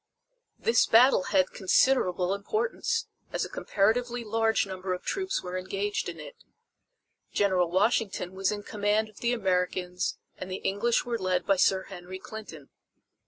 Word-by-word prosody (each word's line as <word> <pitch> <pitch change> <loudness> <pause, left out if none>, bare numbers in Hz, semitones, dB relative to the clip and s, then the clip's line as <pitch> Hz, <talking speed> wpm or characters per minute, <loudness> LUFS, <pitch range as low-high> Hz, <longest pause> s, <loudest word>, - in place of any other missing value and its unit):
This 460 - +3
battle 230 -4 +5
had 185 -2 +2
considerable 185 -3 +2
importance, 440 - -1 0.3
as - - -1
a - - -8
comparatively 240 - 0
large 225 0 +1
number 185 -1 -3
of 180 - -11
troops 385 0 -2
were 180 0 -5
engaged 200 +2 -2
in - - -8
it. - - -9 1.0
General 185 -4 +2
Washington 190 -1 +1
was 190 +1 0
in 205 -1 -4
command 210 +1 0
of 215 - -16
the 235 - +1
Americans 180 -4 -1 0.2
and 185 - -6
the 185 - -3
English 225 +5 +1
were 235 -1 -2
led 185 -1 0
by 195 -1 +3
Sir 190 +1 +3
Henry 185 0 -9
Clinton. 190 -8 -10
200 Hz, 150 wpm, -28 LUFS, 185-230 Hz, 1.0 s, battle